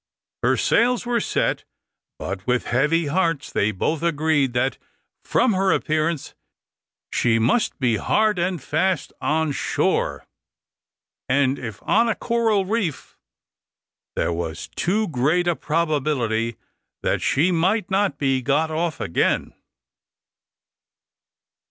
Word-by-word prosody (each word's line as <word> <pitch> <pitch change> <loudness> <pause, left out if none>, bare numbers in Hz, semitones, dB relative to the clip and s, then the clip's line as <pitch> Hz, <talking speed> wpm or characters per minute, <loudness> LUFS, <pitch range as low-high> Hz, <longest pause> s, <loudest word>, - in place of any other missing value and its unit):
Her - - +2
sails 245 +1 +2
were 240 -1 +1
set, - - -1 0.5
but 95 +2 -6
with 125 0 +1
heavy 150 +7 +2
hearts, 165 -1 0
they 100 - +1
both 145 - -1
agreed 155 -5 +1
that, 130 +2 0 0.4
from 250 -4 +2
her 190 0 +2
appearance, 155 -1 -1 0.8
she 115 -2 +2
must 120 - +1
be 120 -5 +1
hard 215 - +1
and 180 0 0
fast 160 +4 -1
on 160 0 +1
shore, - - -1 1.0
and 135 0 +2
if 110 -6 -7
on 230 +2 +3
a 225 - +1
coral 225 -4 +1
reef 195 -7 -2 1.0
there 85 - 0
was 85 -1 -5
too 210 +5 0
great 155 +5 +1
a 175 - +2
probability 140 -9 -1 0.5
that - - 0
she 165 +7 +2
might 190 +5 +1
not 195 -6 +1
be 135 -2 +1
got 145 +5 +1
off 160 0 -2
again. 85 - 0
155 Hz, 120 wpm, -22 LUFS, 130-190 Hz, 1.0 s, on